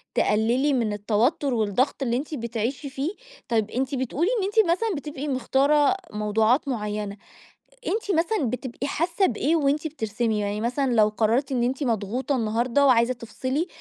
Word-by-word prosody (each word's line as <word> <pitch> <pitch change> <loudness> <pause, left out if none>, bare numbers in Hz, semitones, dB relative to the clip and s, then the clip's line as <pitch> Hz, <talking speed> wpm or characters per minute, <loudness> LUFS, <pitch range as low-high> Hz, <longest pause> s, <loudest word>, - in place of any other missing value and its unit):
تقللي 235 +7 +2
من 230 -5 0
التوتر 230 +7 +1
والضغط 230 +5 0
اللي 240 -2 0
أنتِ 290 +4 -5
بتعيشي 235 +3 -3
فيه؟ 270 +5 -3 0.4
طب 220 -3 0
أنتِ 265 +2 -1
بتقولي 270 - 0
إن - - -1
أنتِ 410 -3 +3
مثلًا 415 +3 0
بتبقي 295 0 -5
مختارة 280 +5 +2 0.2
موضوعات 215 +6 +2
معينة، 210 -4 -3 0.7
أنتِ 410 +3 -1
مثلًا 330 - +1
بتبقي 255 +2 -4
حاسة 340 +6 +1
بإيه 290 - +1
وأنتِ 295 0 +1
بترسمي؟ 225 -6 -2
يعني 205 +1 -2
مثلًا 250 +4 0
لو 215 -2 +5
قررتِ 230 +6 0
إن 250 -2 +1
أنتِ 260 +4 -1
مضغوطة 240 +3 -1
النهاردة 235 +4 +1
وعايزة 245 -1 +4
تفصلي، 255 +7 -3
255 Hz, 150 wpm, -25 LUFS, 220-290 Hz, 0.7 s, لو